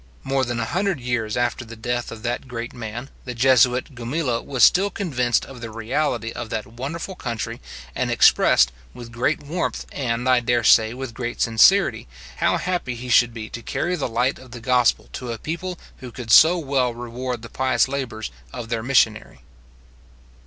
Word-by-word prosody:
More 135 0 0
than 120 -1 -2
a 115 - -1
hundred 190 - -1
years 120 -3 -2
after 120 0 0
the 115 -1 -10
death 120 +2 -3
of 110 0 -9
that 120 +2 -3
great 120 -1 -6
man, 120 +2 -7
the 125 -1 -6
Jesuit 125 +2 +3
Gumila 120 +1 -2
was 130 -5 0
still 195 - +5
convinced 125 -12 0
of 130 -3 -11
the 115 - -6
reality 115 +1 -2
of 120 -1 -6
that 110 - -3
wonderful 140 +10 -6
country, 115 - -5 0.3
and - - -1
expressed, - - +5 0.2
with 120 -1 -10
great 125 +7 -1
warmth, 165 +5 -3
and, 120 -2 -2
I 130 -1 +5
dare 120 0 +1
say, 110 +1 +5
with 130 -2 -6
great 120 0 -5
sincerity, 125 - +4 0.3
how - - +2
happy 175 -9 -2
he 125 +2 -7
should 120 0 +5
be 110 -2 -7
to 120 - -6
carry 175 +9 -2
the 145 -7 -3
light 125 +4 0
of 130 - -14
the 120 0 -9
gospel 125 +1 +2
to 125 -2 -5
a 115 - -4
people 175 +6 -5 0.2
who 125 -2 -9
could 115 -1 -6
so 165 +8 +8
well 135 -6 0
reward 120 0 -5
the 115 - -8
pious 130 +2 +1
labours 130 - -4 0.2
of 120 -2 -7
their 115 -2 -1
missionary. 110 - +1
120 Hz, 185 wpm, -22 LUFS, 115-135 Hz, 0.3 s, so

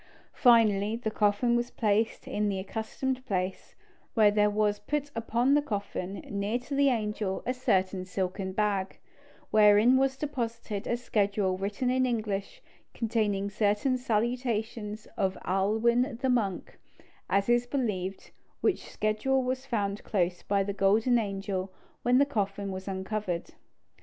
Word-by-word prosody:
Finally, 220 -4 +4
the 230 -2 -3
coffin 210 +3 +2
was 240 0 0
placed 225 +3 0
in 210 -6 0
the 195 - -1
accustomed 230 +6 -3
place, 185 -2 -3 0.4
and 210 -2 +5
there 210 0 +4
was 210 0 +1
put 290 +6 -3
upon 235 +4 +1
the 295 - +4
coffin, 200 -6 -4
near 205 +3 -1
to 250 +3 -8
the 280 0 +4
angel, 210 -5 -2
a 255 - 0
certain 190 -7 0
silken 190 +1 -3
bag, 200 -1 -1 0.5
wherein 215 +4 +6
was 270 0 +1
deposited 230 -7 -4
a 235 - 0
schedule 200 -5 0
written 205 +7 -1
in 255 0 +2
English, 215 - -3 0.3
containing 215 -4 0
certain 210 +5 +1
salutations 225 -2 -2
of 190 -1 0
Ailwin 230 +6 +1
the 265 - 0
monk, 215 -7 -1 0.5
as 200 0 +2
is 240 0 +3
believed, 200 -8 -3 0.3
which - - 0
schedule 235 +5 0
was 260 +1 -3
found 205 -4 -2
close 180 -3 0
by 200 -1 +1
the 200 +1 -3
golden 215 +5 +3
angel 195 -2 -3 0.3
when 245 +1 +3
the 280 - +5
coffin 200 -6 -2
was 190 +1 -6
uncovered. 190 -2 -3
215 Hz, 140 wpm, -29 LUFS, 200-245 Hz, 0.5 s, wherein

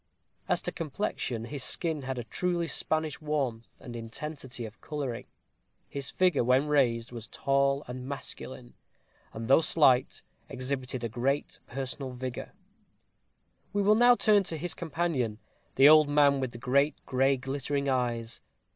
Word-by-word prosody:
As - - +1
to - - -2
complexion, 140 - -3
his 140 +1 -5
skin 160 -1 -1
had 130 -1 -4
a 120 - -3
truly 175 +7 -1
Spanish 155 -1 -1
warmth 135 -7 -3
and 120 -3 -9
intensity 125 +2 -5
of 110 +1 -11
coloring. 140 -6 -4 0.6
His 140 -1 -3
figure, 185 -7 +2
when 130 +4 +3
raised, 125 -5 +1
was 115 -2 -7
tall 140 +1 +1
and 125 +1 -6
masculine, 65 - -7 0.6
and 115 0 -6
though 135 +5 +6
slight, 140 -6 +3 0.3
exhibited 130 -2 -3
great 135 +5 -1
personal 130 0 -5
vigor. 125 0 -6 1.2
We 205 0 +1
will 210 +2 +5
now 245 +2 +6
turn 210 -4 +4
to 165 - -4
his 175 +3 -4
companion, 155 -9 -2 0.4
the 135 +2 +7
old 155 -1 +7
man 145 -1 +4
with 130 -2 -2
the 120 - -9
great 140 +5 +2
gray 135 +1 +2
glittering 140 +2 -2
eyes. 120 -3 -1
135 Hz, 145 wpm, -29 LUFS, 125-150 Hz, 1.2 s, the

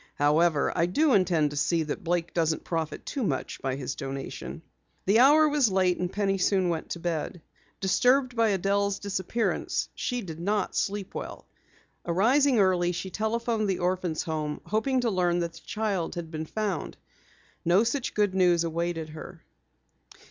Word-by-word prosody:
"However, 150 +1 +2
I 170 - +2
do 290 - +2
intend 170 -7 +3
to - - -6
see 160 +3 +1
that 150 - -5
Blake 170 0 -1
doesn't 160 -2 0
profit 165 -2 -3
too 275 - -4
much 145 -10 -3
by 135 -1 -1
his 135 -1 -4
donation." 135 +4 -6 0.4
The 205 +4 +4
hour 300 +4 +7
was 290 -7 +2
late 185 -2 +2
and 180 0 -2
Penny 195 -1 0
soon 185 -1 +2
went 165 -2 -3
to 170 - -4
bed. 170 0 -3 0.4
Disturbed 250 +6 +2
by 230 -1 +3
Adelle's 200 +1 +1
disappearance, 200 +3 -2
she 245 -1 -2
did 165 -3 -8
not 205 +4 -1
sleep 200 -1 -2
well. - - -7 0.6
Arising 245 +10 +3
early, 180 -3 +3
she 185 +2 -5
telephoned 220 0 -1
the 190 - 0
Orphans' 180 -2 -1
Home, 155 -3 -3
hoping 250 +5 0
to 235 -2 0
learn 175 -2 +1
that 170 -1 -3
the - - -12
child 205 -6 -2
had 165 -2 -6
been 155 -1 -5
found. 205 -4 -3 0.7
No 180 +5 +4
such 240 +2 -2
good 205 -2 +2
news 175 -3 +3
awaited 165 -1 -2
her. 155 +1 -10
185 Hz, 165 wpm, -27 LUFS, 165-215 Hz, 0.7 s, hour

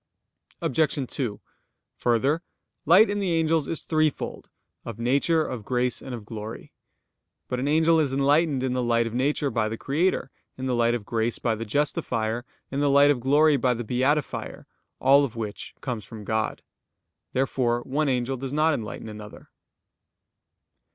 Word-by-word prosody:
Obj. 145 -1 +1
2: 110 -7 -3 0.6
Further, 130 +7 +1 0.5
light 185 +8 +7
in 205 - -1
the 190 -4 0
angels 160 -2 +1
is 165 - -2
threefold; 155 -2 -1 0.3
of - - -7
nature, 140 +7 +2
of 120 -4 -5
grace, 125 +2 -1
and 130 -2 -6
of 110 -3 -9
glory. 110 0 -8 0.8
But 125 - -2
an 135 - -1
angel 160 +2 +4
is 145 -4 +1
enlightened 140 +1 +2
in 130 -1 0
the 125 - 0
light 115 -1 +2
of 115 - -5
nature 140 +2 0
by 110 -2 0
the 115 - -4
Creator; 150 +2 0 0.3
in 130 - -4
the 130 - 0
light 120 0 +2
of 110 -4 -5
grace 115 0 -1
by 115 - 0
the 110 +1 -4
Justifier; 120 -2 -1 0.3
in 140 - -2
the 145 0 +2
light 140 +1 +6
of 140 - 0
glory 145 +4 +4
by 125 -2 +1
the 120 - -4
Beatifier; 130 +6 -1 0.3
all 140 +2 +5
of 125 -5 -3
which 105 -3 -6
comes 120 -5 -4
from 110 +3 -10
God. 110 +1 -2 0.7
Therefore 125 -2 +1
one 145 +4 -1
angel 130 +1 0
does 130 +1 -5
not 155 +2 +3
enlighten 110 -3 -5
another. 105 -1 -10
130 Hz, 165 wpm, -25 LUFS, 115-145 Hz, 0.8 s, light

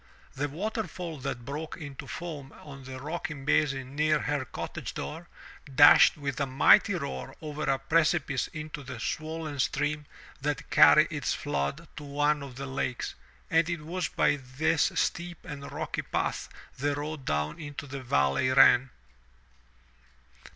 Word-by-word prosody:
The 145 +2 -2
waterfall 180 -2 -4
that 120 -2 -4
broke 150 +4 -5
into 145 -5 -8
foam 150 -5 -6
on 135 -2 -12
the 130 0 -7
rocky 155 +2 -4
basin 135 -1 0
near 155 +1 +3
her 145 -3 -1
cottage - - -6
door, 165 +3 -6 0.5
dashed 145 +3 +8
with 140 -2 -3
a 140 - 0
mighty 130 +1 +5
roar 65 -1 -5
over 155 -1 -4
a 135 - +3
precipice 150 -1 +1
into 155 -1 -7
the 130 -3 -8
swollen 155 +3 -4
stream 145 +3 0 0.4
that - - -3
carried - - +7
its - - -1
flood 75 - -2
to 150 - -6
one 145 +1 +1
of 135 -3 -8
the 140 +2 -5
lakes, 130 -2 -3 0.4
and 165 0 +3
it 170 -2 -2
was 175 +4 -2
by 145 - +2
this 145 +5 +1
steep 175 -1 -1
and 140 -1 -7
rocky - - -3
path - - -2 0.3
the 145 +1 0
road 150 0 -5
down 75 -2 -1
into 145 -2 -7
the 135 -1 -6
valley 70 - +2
ran. 130 0 +6
145 Hz, 150 wpm, -29 LUFS, 135-155 Hz, 0.5 s, dashed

